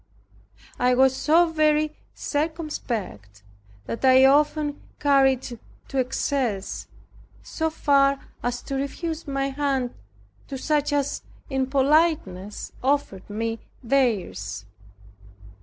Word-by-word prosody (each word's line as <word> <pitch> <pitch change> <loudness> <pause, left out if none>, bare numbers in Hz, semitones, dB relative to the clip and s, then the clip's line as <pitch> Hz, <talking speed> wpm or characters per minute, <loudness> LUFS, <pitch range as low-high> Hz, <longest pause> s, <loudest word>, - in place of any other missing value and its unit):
I 250 0 +3
was 265 +1 +4
so 330 +4 +3
very 305 -1 +2 0.2
circumspect 240 - -4 0.4
that 230 - -5
I 260 0 +7
often 295 +1 +2 0.2
carried 270 -3 +3
it 235 - -8 0.3
to 270 - -1
excess, 250 -5 -1 0.6
so 320 0 -2
far 280 -3 +3 0.2
as 245 0 -2
to 275 - -4
refuse 315 +4 -4
my 275 0 -1
hand 270 -3 -1 0.5
to 270 - -5
such 295 +2 0
as 285 -1 0 0.3
in 265 -1 0
politeness 270 - +1
offered 265 -9 -1
me 225 +2 -3 0.2
theirs. 180 - 0
270 Hz, 105 wpm, -24 LUFS, 240-295 Hz, 0.6 s, I